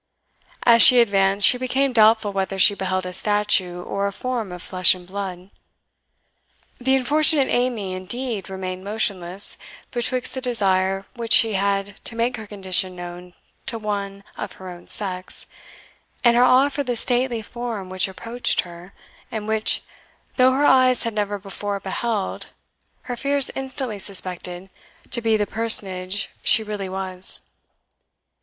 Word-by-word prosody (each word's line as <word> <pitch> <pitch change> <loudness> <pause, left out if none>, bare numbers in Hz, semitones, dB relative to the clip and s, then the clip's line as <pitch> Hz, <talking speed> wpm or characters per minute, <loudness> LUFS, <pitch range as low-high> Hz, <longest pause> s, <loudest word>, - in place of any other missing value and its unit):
As 235 -1 +6
she 250 +3 +11
advanced, 195 -3 +3
she 250 - +5
became 260 +1 0
doubtful 220 -2 +4
whether 195 0 -2
she 190 +2 +6
beheld 185 -1 -2
a 180 - -6
statue, 190 -3 +1
or 200 +2 -2
a - - -3
form 235 -2 -4
of 180 -1 -8
flesh 185 0 +3
and 180 -1 -13
blood. 190 0 -7 1.3
The 265 +2 +2
unfortunate 285 +2 +2
Amy, 240 -6 -1
indeed, 210 +3 -4
remained 185 -1 -6
motionless, 200 -3 -1 0.3
betwixt 250 +1 -1
the 260 - -5
desire 195 -5 0
which 230 -2 -1
she 225 -1 +7
had 200 +1 -2
to 230 - -3
make 240 +1 -1
her 220 -1 -9
condition 185 -2 -1
known 175 0 -10 0.3
to 230 - -1
one 200 -2 -5
of 210 - -7
her 185 -1 -10
own 175 0 -13
sex, 185 -3 -3 0.8
and 235 -1 +5
her 240 - +4
awe 255 +3 +4
for 285 0 -3
the 250 -3 -2
stately 245 -1 0
form 230 -4 -6
which 185 0 -1
approached 230 +6 0
her, 175 +2 -13 0.4
and 215 -1 -5
which, 220 0 +1 0.5
though 255 0 +4
her 280 +2 +1
eyes 255 -2 +4
had 230 - -3
never 205 -1 -2
before 200 +1 -5
beheld, 200 +1 -3 0.6
her 245 - -5
fears 280 +1 +1
instantly 260 -5 -4
suspected 185 -1 -3 0.4
to 235 - -1
be 225 -1 +2
the 210 - 0
personage 200 -3 0
she 220 - +4
really 205 -3 -5
was. 185 -1 -2
205 Hz, 150 wpm, -22 LUFS, 190-240 Hz, 1.3 s, she